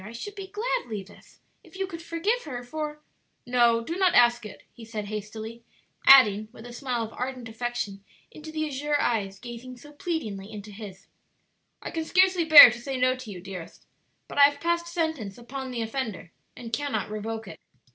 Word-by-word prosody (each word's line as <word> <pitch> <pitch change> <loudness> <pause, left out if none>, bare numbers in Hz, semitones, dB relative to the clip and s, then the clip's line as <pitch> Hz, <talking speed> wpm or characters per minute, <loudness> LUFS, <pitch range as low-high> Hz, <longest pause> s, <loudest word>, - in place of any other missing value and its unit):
I 215 +3 -9
should 410 - -7
be 390 -1 -8
glad, 460 +5 -2
Levis, 205 -3 -10 0.2
if - - -18
you 385 - -1
could 335 -3 -8
forgive 395 +9 -1
her, 245 -5 -6
for 300 +3 -5 0.2
" - - -47
"No, 240 -2 +3
do 330 +9 -4
not 375 -2 +3
ask 240 -2 +4
it," - - -13
he 235 - -13
said 220 -2 -5
hastily; 215 +2 -7 0.4
adding, 215 -6 +7
with 230 -1 -13
a 240 - -9
smile 245 -2 -2
of 225 - -7
ardent 250 -1 -5
affection 225 -3 -4 0.3
into 310 +1 -10
the 310 0 -2
azure 295 0 -1
eyes 200 -5 0
gazing 240 +3 -9
so 295 +4 -14
pleadingly 220 - -4
into 210 -1 -9
his; 200 -2 -10 0.8
"I - - -5
can 325 - -2
scarcely 370 0 +3
bear 310 -6 +12
to 240 - -7
say 270 +1 -4
no 255 0 +2
to 255 -3 -10
you, 185 -3 -8
dearest, 185 -3 -9 0.4
but - - -4
I 280 - +10
have 285 0 +1
passed 340 +1 0
sentence 320 - -3
upon 260 +2 -7
the 240 -2 -3
offender 225 -7 -5 0.3
and 230 -2 -9
cannot 285 -3 -2
revoke 220 +1 -5
it." - - -10
245 Hz, 195 wpm, -26 LUFS, 220-300 Hz, 0.8 s, bear